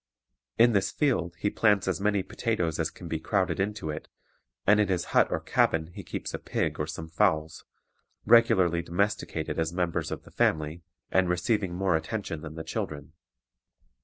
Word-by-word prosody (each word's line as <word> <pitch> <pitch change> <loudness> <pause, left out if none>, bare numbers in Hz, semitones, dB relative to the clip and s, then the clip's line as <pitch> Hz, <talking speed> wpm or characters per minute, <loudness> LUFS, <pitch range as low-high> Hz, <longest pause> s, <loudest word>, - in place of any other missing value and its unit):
In 120 +1 +6
this 100 -2 +2
field 90 - 0
he 105 +4 -1
plants 105 -4 +3
as 95 +1 -1
many 100 -2 +1
potatoes 90 -10 -2
as 80 - +1
can 90 - -11
be 80 -1 -2
crowded 95 +3 0
into 95 -5 -2
it; 75 - -7 0.6
and 105 +2 +5
in 105 - +3
his 90 -2 0
hut - - +5
or - - -1
cabin 80 0 +1
he - - -7
keeps - - -5
a - - -3
pig - - -2
or - - -1
some 80 - -6
fowls, 80 -3 0 0.6
regularly 95 -7 +5
domesticated 85 -2 -2
as 80 0 0
members 85 -2 -1
of - - -5
the - - -16
family, 80 +2 0 0.3
and 95 -1 +3
receiving 90 +1 0
more 95 -1 +1
attention 80 0 -3
than 75 0 -8
the 80 - -5
children. 75 -1 -5
90 Hz, 175 wpm, -28 LUFS, 80-105 Hz, 0.6 s, In